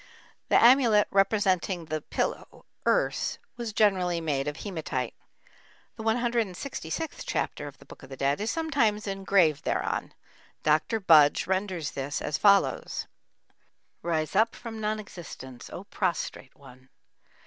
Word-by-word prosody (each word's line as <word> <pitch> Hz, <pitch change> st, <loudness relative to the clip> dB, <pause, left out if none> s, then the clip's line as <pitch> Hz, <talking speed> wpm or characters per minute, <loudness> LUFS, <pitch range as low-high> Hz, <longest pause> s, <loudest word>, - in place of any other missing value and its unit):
The -, -, +6 dB
amulet 235 Hz, -4 st, +6 dB
representing 195 Hz, -3 st, +2 dB
the 155 Hz, 0 st, -3 dB
pillow, -, -, -4 dB, 0.2 s
urs, -, -, +1 dB, 0.2 s
was 235 Hz, -2 st, -4 dB
generally 185 Hz, -5 st, +2 dB
made 145 Hz, -4 st, -1 dB
of 150 Hz, +1 st, -3 dB
hematite. 155 Hz, -, -4 dB, 0.8 s
The 220 Hz, -, -7 dB
166th 235 Hz, -, -2 dB
chapter 145 Hz, -, -2 dB
of 145 Hz, 0 st, -11 dB
the -, -, -17 dB
Book -, -, -14 dB
of -, -, -13 dB
the 135 Hz, -, -8 dB
Dead 140 Hz, +6 st, 0 dB
is 215 Hz, -, -1 dB
sometimes 275 Hz, -10 st, +1 dB
engraved 195 Hz, -6 st, +2 dB
thereon. -, -, -2 dB, 0.5 s
Dr. 155 Hz, +9 st, +2 dB
Budge 155 Hz, -6 st, +5 dB
renders 185 Hz, -5 st, -1 dB
this 140 Hz, +1 st, -3 dB
as 145 Hz, -, -2 dB
follows: 200 Hz, -1 st, +3 dB, 1.0 s
Rise 160 Hz, 0 st, -1 dB
up 225 Hz, +3 st, +3 dB
from 225 Hz, -2 st, -7 dB
non 215 Hz, 0 st, -1 dB
existence, 130 Hz, -, -10 dB
O -, -, -7 dB
prostrate -, -, -3 dB
one! 130 Hz, +1 st, -16 dB
190 Hz, 130 wpm, -27 LUFS, 155-220 Hz, 1.0 s, The